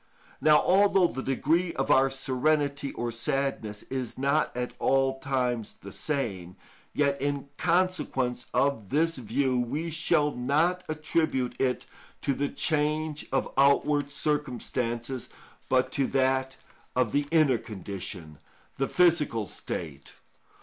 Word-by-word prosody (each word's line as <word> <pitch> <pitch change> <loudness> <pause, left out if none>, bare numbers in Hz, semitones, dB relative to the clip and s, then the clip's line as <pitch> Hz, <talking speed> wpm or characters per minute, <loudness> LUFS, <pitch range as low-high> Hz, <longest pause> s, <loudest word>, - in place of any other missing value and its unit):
Now 150 +1 +6
although 195 0 +4
the 135 -6 -2
degree 160 +7 +1
of 135 - 0
our 135 +1 +5
serenity 140 +2 0
or 120 0 -3
sadness 115 -3 -2
is 130 -3 -5
not 140 +3 +1
at 125 0 -3
all 135 0 +2
times 125 -5 -1
the 100 - -10
same, 100 - -3 0.4
yet, 140 -2 +1
in 140 0 -2
consequence 135 -9 0
of 135 -8 0
this 165 +2 +1
view, 125 +2 0
we 145 +8 -2
shall 150 -2 +2
not 155 +9 +1
attribute 155 -4 0
it 130 -1 0 0.4
to 140 - +1
the 140 +1 -1
change 155 0 0
of 135 - -1
outward 140 +1 +3
circumstances, 130 -4 -2 0.4
but 130 0 +2
to 135 0 +1
that 130 0 +1 0.4
of 125 -4 +2
the 145 0 +1
inner 155 -7 +4
condition, 95 -6 -7 0.4
the 135 - 0
physical 155 -11 +2
state. 75 -6 -6
135 Hz, 125 wpm, -28 LUFS, 125-150 Hz, 0.4 s, Now